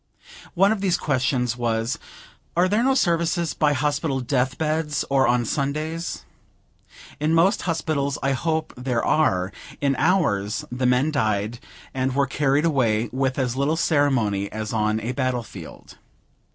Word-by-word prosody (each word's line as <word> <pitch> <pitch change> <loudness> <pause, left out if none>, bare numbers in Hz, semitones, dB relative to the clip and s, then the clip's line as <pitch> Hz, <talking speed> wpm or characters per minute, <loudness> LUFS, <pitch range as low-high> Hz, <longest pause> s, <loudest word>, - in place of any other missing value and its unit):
One 195 +3 +4
of 220 -3 -1
these 185 -3 +2
questions 125 -3 0
was, 115 0 -1 0.6
"Are 180 +1 +4
there 210 +4 +2
no 265 +1 +3
services 170 - +1
by 150 -2 +2
hospital 145 0 0
death 125 0 0
beds, 155 -2 -1
or 135 -2 +4
on 120 0 +2
Sundays?" 155 +6 -3 0.9
In 155 +2 +1
most 175 +4 +3
Hospitals 145 -3 -1
I 135 - +2
hope 160 +3 -1
there 125 -1 -1
are; 95 -12 +2 0.3
in 140 -1 +1
ours, 105 - +1
the 125 +1 0
men 125 +5 +2
died, 110 -4 -1 0.3
and 130 0 -1
were 140 0 +3
carried 140 +2 +1
away, 120 -7 +1
with 130 0 -1
as 130 -3 -1
little 140 +4 +1
ceremony 125 - +1
as 110 +1 -4
on 110 0 +1
a 115 +3 -3
battle 130 -2 -1
field. 90 -7 -12
135 Hz, 150 wpm, -23 LUFS, 120-155 Hz, 0.9 s, One